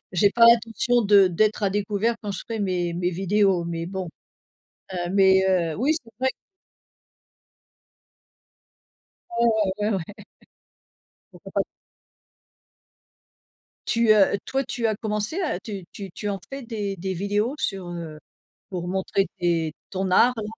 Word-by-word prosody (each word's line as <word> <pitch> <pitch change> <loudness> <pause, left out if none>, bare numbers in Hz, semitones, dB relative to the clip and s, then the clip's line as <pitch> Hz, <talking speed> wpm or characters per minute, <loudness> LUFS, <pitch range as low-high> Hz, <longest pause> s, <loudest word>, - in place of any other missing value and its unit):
j'ai 195 +3 +4
pas 235 - +6
l'intention 235 +1 +4
de 200 -2 +6
d'être 210 +5 +1
à 200 - +2
découvert 205 +3 0
quand 210 - -4
je 190 - -5
ferais 225 -1 -5
mes 180 -3 -1
mes 175 +1 0
vidéos, 190 0 +1
mais 170 0 -4
bon, 190 0 -5 0.8
heu, 175 -1 -3
mais, 190 -1 +5
heu, 170 -4 +1
oui, 275 +8 +2
c'est 245 -8 -8
vrai 260 - +2
que - - -16 2.9
Ah - - -9 0.4
ouais, 210 +1 +1
ouais, 210 - +1
ouais. 175 - -4 1.3
Pourquoi - - -13
pas? - - +2 2.3
Tu, 230 -1 +3
heu, 200 -1 +4
toi, 270 0 -2
tu 235 -1 -3
as 220 -2 +2
commencé 210 - 0
à 310 - -2
tu 200 -4 -7
tu 195 -3 -8
tu 205 - -6
en 200 -1 -2
fais 275 0 -6
des 210 -5 -4
des 190 +2 -3
vidéos 205 - -1
sur, 195 -9 -3
heu, 165 -3 -7 0.5
pour 175 -2 -4
montrer 190 +1 0
tes 165 -3 0 0.2
ton 190 -1 -2
art 245 +6 +5
là? 220 - -4
200 Hz, 150 wpm, -24 LUFS, 180-220 Hz, 2.9 s, pas